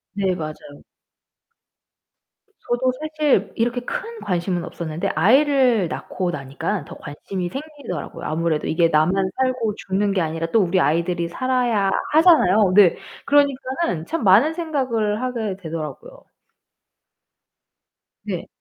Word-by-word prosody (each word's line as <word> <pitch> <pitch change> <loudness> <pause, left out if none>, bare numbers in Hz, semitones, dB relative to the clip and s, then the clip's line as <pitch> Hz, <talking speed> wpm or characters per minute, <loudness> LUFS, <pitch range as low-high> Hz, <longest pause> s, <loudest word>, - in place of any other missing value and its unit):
네. 190 -2 0
맞아요. 155 -2 -5 2.1
저도 250 +2 0
사실 305 -9 +1
이렇게 240 +2 0
큰 455 - -6
관심은 175 -1 -1
없었는데 170 +2 -4
아이를 250 - +4
낳고 180 -2 -3
나니까 150 +5 -4
더 - - -10
관심이 175 +5 -6
생기더라고요. 275 - -7
아무래도 160 0 -1
이게 165 +1 +3
나만 180 +5 +2
살고 250 -5 0
죽는 200 +1 -1
게 190 - +1
아니라 165 0 -2
또 225 - +4
우리 185 0 +1
아이들이 170 +3 0
살아야 240 -2 0 0.2
하잖아요. 220 - +5
네. 200 -4 +6 0.3
그러니까는 275 - +1
참 330 - -3
많은 215 +11 +5
생각을 255 -10 -1
하게 230 -6 -3
되더라고요. 160 -6 -7 2.0
네. - - -4
200 Hz, 280 characters per minute, -21 LUFS, 170-255 Hz, 2.1 s, 네